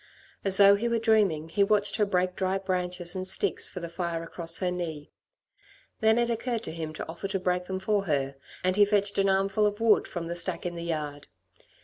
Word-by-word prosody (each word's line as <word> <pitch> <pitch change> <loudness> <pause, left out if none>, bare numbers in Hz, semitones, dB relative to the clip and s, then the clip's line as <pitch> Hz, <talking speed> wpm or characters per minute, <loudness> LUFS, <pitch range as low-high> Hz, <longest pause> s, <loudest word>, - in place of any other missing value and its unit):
As 195 -1 +3
though 200 0 +8
he 235 +4 -1
were 235 - +1
dreaming, 210 -9 +2
he 200 +5 +2
watched 205 0 +1
her 210 -2 +2
break 180 -1 0
dry 190 0 0
branches 180 -2 -2
and 185 0 -3
sticks 190 - +1
for 180 - -7
the 170 - -4
fire 170 -1 -3
across 165 0 -1
her 180 -2 -1
knee. 160 -4 -5 0.9
Then 220 0 +4
it 240 0 +1
occurred 230 0 -2
to - - -5
him 160 -1 -5
to - - -6
offer 170 +4 -5
to 195 0 -2
break 180 0 -1
them 190 0 -3
for 200 +1 0
her, 140 -4 0 0.3
and 185 0 +2
he 205 - +6
fetched 200 -1 +2
an 195 0 +3
armful 195 +2 +2
of 205 +1 -3
wood 225 -2 +3
from 175 -2 -5
the 170 +1 -4
stack 175 0 -2
in 175 - -2
the 170 - -6
yard. 150 -3 -4
185 Hz, 225 wpm, -27 LUFS, 170-205 Hz, 0.9 s, though